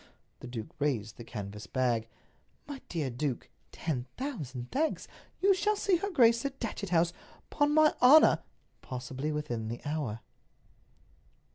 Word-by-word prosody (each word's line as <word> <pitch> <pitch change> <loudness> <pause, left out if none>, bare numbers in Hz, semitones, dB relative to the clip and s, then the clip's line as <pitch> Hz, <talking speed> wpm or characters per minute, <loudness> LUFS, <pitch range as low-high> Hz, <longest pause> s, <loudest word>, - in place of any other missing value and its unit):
The - - -9
duke 115 -3 -6
raised 120 -8 -1
the 120 - -8
canvas 105 -2 -7
bag. 120 -4 0 0.6
"My 280 -2 -7
dear 150 -6 -2
duke, 130 +1 -3 0.2
ten 130 -6 -3
thousand 145 - -5
thanks! 310 +4 0 0.3
You 395 +1 +6
shall 420 +3 +1
see 400 -3 +2
her 400 +4 -3
grace 235 - +4
at 275 -1 -4
Datchet 210 -4 -4
House, 170 0 +3 0.4
'pon 290 0 +2
my 310 0 +5
honor, 290 +5 +8 0.4
probably 130 +3 -4
within 120 -7 -3
the 120 +2 -4
hour." 145 -8 -3
150 Hz, 140 wpm, -30 LUFS, -, 0.6 s, honor